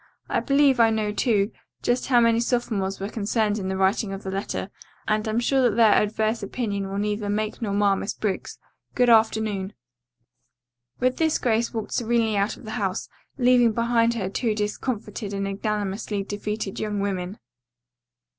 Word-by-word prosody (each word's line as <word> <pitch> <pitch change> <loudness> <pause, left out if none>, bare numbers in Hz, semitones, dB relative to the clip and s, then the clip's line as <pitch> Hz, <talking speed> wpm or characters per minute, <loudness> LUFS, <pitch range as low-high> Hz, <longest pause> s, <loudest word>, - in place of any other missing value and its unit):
I - - +1
believe 275 -2 +3
I 230 -1 +6
know 215 -1 0
too, 210 -2 +1 0.3
just 245 +1 0
how 250 -3 +5
many 230 -1 +4
sophomores 225 -5 -1
were 195 - -3
concerned 215 0 0
in 190 - -4
the 190 - -2
writing 195 +2 +1
of 195 - -7
the 190 - -4
letter, 195 0 -3 0.4
and 215 0 +1
am 220 +2 +1
sure 265 +2 +2
that 240 -5 +3
their 225 -3 +6
adverse 220 +2 +1
opinion 200 -2 -3
will 195 - -4
neither 205 0 -1
make 215 +2 -2
nor 215 -3 -2
mar 200 -1 +3
Miss 200 +2 -4
Briggs. 200 -3 -3 0.4
Good 245 -1 +4
afternoon." 220 -3 +2 1.3
With 255 0 +1
this 320 -1 +2
Grace 235 -1 +1
walked 220 -2 -4
serenely 230 -2 +1
out 200 +2 0
of - - -14
the 215 0 -4
house, 190 -2 -2 0.3
leaving 245 -3 +4
behind 235 0 +2
her 200 -5 -2
two 215 +3 -1
discomfited 210 0 -3
and 195 0 -2
ignominiously 200 0 -2
defeated 205 0 -4
young 210 -1 -2
women. 195 0 -3
215 Hz, 170 wpm, -24 LUFS, 200-235 Hz, 1.3 s, I